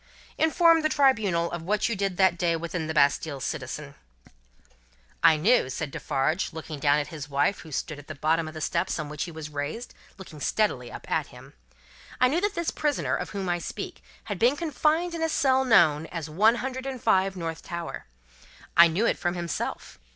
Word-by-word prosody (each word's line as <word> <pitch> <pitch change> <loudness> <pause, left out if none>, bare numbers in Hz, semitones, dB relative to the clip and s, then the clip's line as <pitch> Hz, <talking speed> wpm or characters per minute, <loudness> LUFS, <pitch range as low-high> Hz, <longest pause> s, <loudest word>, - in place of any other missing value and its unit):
"Inform 330 +1 +5
the 310 - +1
Tribunal 220 - +2
of 170 - -4
what 205 +5 0
you 230 - -1
did 195 -2 -2
that 190 -2 +4
day 170 -1 +1
within 165 0 -4
the 160 - -2
Bastille, 145 0 +2
citizen." 140 +1 -5 1.3
"I 160 - +6
knew," 190 - +3
said 145 +2 -4
Defarge, 155 +9 -1
looking 160 -2 -7
down 145 +1 +3
at 150 - -2
his 150 -3 -7
wife, 145 +7 +1
who 160 - -11
stood 150 +2 -4
at 145 - -14
the 155 - -7
bottom 160 +3 +1
of 155 - -9
the 155 - -6
steps 170 +2 -1
on 155 -2 -4
which 150 0 -3
he 175 - -8
was 155 -1 -8
raised, 145 +12 -5 0.2
looking 180 -6 -11
steadily 130 - 0
up - - -9
at - - +1
him; - - -14 0.7
"I 255 - +5
knew 325 +6 +1
that 410 0 0
this 340 -1 -1
prisoner, 295 -2 0
of - - -4
whom 195 -2 -4
I 175 0 0
speak, - - -6 0.2
had 205 -4 -5
been 250 +5 +3
confined 325 +2 0
in 335 - -4
a 325 - +1
cell 265 -3 +3
known 165 - +4
as 165 -3 -5
One 210 +9 +4
Hundred 260 +2 -4
and 265 -2 -4
Five, 195 -2 +2
North 165 -2 -4
Tower. 170 - -6 0.7
I 170 0 +9
knew 175 +8 0
it - - +1
from 175 0 -1
himself. 170 -3 -4
170 Hz, 200 wpm, -26 LUFS, 155-240 Hz, 1.3 s, I